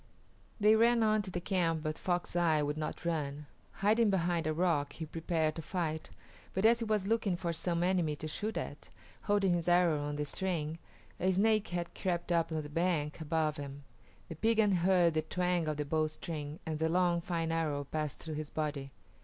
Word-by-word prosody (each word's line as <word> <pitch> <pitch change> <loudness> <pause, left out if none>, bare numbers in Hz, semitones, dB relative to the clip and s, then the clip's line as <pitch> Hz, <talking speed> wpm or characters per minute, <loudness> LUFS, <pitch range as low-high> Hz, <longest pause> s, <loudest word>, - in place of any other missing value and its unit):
They 210 +1 +6
ran 230 +1 +4
on 215 -1 +3
to 195 - -6
the 180 - -3
camp, 170 -3 0
but 155 -1 -2
Fox 175 0 -2
Eye 160 -3 +3
would 145 0 -1
not 155 +2 -5
run. 150 -3 -2 0.4
Hiding 220 +1 +4
behind 175 -4 +1
a - - +1
rock 155 -3 +1
he 160 - -5
prepared 160 0 -1
to - - -3
fight, 160 -2 -3 0.5
but 190 +3 +1
as 230 +1 +6
he 230 - -2
was 215 -3 0
looking 205 -4 +1
for 170 -2 -2
some 170 +1 -1
enemy 175 -4 +1
to 155 - -6
shoot 210 +8 -3
at, - - -6 0.4
holding 200 -3 +3
his 170 -1 -1
arrow 175 -4 +4
on 145 0 -3
the 150 0 -2
string, 165 -1 -3 0.4
a 185 - +2
Snake 215 +3 +3
had 175 -1 -3
crept 175 -2 -2
up 170 -1 +2
on 155 -1 -1
the - - -7
bank 160 -1 -1
above 155 0 0
him; 140 0 -7 0.4
the - - -6
Piegan 220 +4 +3
heard 175 -1 +4
the 155 - +1
twang 180 +1 0
of 155 -1 -1
the 150 - -2
bowstring, 155 0 -2
and 155 -2 -3
the 160 0 +1
long, 175 0 +2
fine 165 -2 -2
arrow 155 -3 0
passed 150 0 -3
through 160 - -7
his 155 0 -4
body. 145 -3 -3
170 Hz, 200 wpm, -32 LUFS, 155-185 Hz, 0.5 s, They